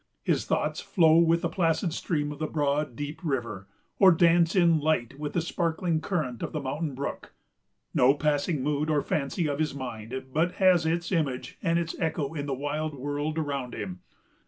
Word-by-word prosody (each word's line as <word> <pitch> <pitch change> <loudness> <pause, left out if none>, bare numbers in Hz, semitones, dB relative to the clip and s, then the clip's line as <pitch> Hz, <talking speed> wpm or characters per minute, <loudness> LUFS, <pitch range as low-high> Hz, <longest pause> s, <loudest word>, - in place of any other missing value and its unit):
His - - +1
thoughts - - -1
flow 165 -3 +4
with 170 0 +3
the - - +2
placid 170 -1 0
stream 150 -4 -1
of 145 - -8
the 155 - -1
broad, 145 -3 -1
deep 145 +4 -5
river, 120 - -3 0.3
or 190 -2 +8
dance 170 +1 +4
in 170 -3 +4
light 145 -4 0
with 150 -1 -4
the 175 - +1
sparkling 165 0 -1
current 150 - -2
of - - -4
the 155 - -1
mountain 145 +1 -3
brook. 140 +2 -6 0.6
No 130 +3 +5
passing 145 0 0
mood 150 +1 0
or 150 -2 +2
fancy 155 +3 -1
of 145 0 -2
his 155 -3 -1
mind 125 -1 -6
but 170 +4 +1
has 180 -4 +4
its 170 +2 -1
image 145 -8 -2
and 165 -2 +1
its 170 -1 -2
echo 160 -3 -1
in 145 -2 -4
the 140 - -1
wild 145 +2 -3
world 145 +3 -3
around 140 -5 -3
him. 95 -4 -5
150 Hz, 185 wpm, -27 LUFS, 140-165 Hz, 0.6 s, or